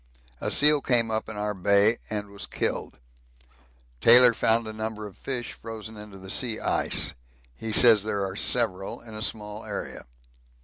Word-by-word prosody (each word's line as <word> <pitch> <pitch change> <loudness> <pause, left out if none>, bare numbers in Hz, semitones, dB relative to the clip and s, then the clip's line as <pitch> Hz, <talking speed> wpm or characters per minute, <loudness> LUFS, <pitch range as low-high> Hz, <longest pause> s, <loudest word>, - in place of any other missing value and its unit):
A - - -3
seal 150 0 +4
came 115 -4 0
up 110 0 -3
in 110 - -7
our 105 0 -2
Bay 100 +4 +2
and 105 -1 -4
was 100 - -8
killed. - - -3 1.0
Taylor 120 - +7
found 115 +1 +2
a 110 - -7
number 110 0 -6
of 100 - -11
fish 125 -3 -5
frozen 110 -1 -9
into 105 -2 -11
the 95 0 -8
sea 110 +1 -1
ice - - +1 0.4
he 110 - -6
says 110 -1 +7
there 100 -1 -3
are 95 0 -6
several 100 -4 0
in 115 -2 -12
a 110 - -8
small 105 -1 -4
area. 105 -10 -7
110 Hz, 170 wpm, -25 LUFS, 105-115 Hz, 1.0 s, Taylor